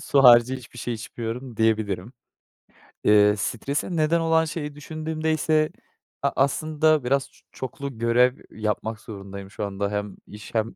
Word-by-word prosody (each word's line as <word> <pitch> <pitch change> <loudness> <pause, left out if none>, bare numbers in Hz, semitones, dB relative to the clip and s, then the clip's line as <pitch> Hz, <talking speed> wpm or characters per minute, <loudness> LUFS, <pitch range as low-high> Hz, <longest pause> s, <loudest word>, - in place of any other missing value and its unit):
su 140 - +3
harici 120 +1 +7
hiçbir 120 -1 -12
şey 120 0 -3
içmiyorum 115 +2 -6
diyebilirim. 110 -1 0 0.9
Eee, 105 0 +6
strese 140 - -2
neden 160 +1 +2
olan 160 0 +3
şeyi 150 -2 -5
düşündüğümde 155 +1 -3
ise 155 0 +2 0.5
a - - +2
aslında 155 +1 +2
biraz 135 +2 0
ç - - -24
çoklu 135 0 -6
görev, 120 +3 +3
eee, - - -18 0.2
yapmak 110 +1 -2
zorundayım 100 -2 -9
şu 105 - -4
anda 100 0 -3
hem 105 -1 -3
iş 105 +2 -11
hem 110 +1 0
125 Hz, 150 wpm, -24 LUFS, 105-150 Hz, 0.9 s, harici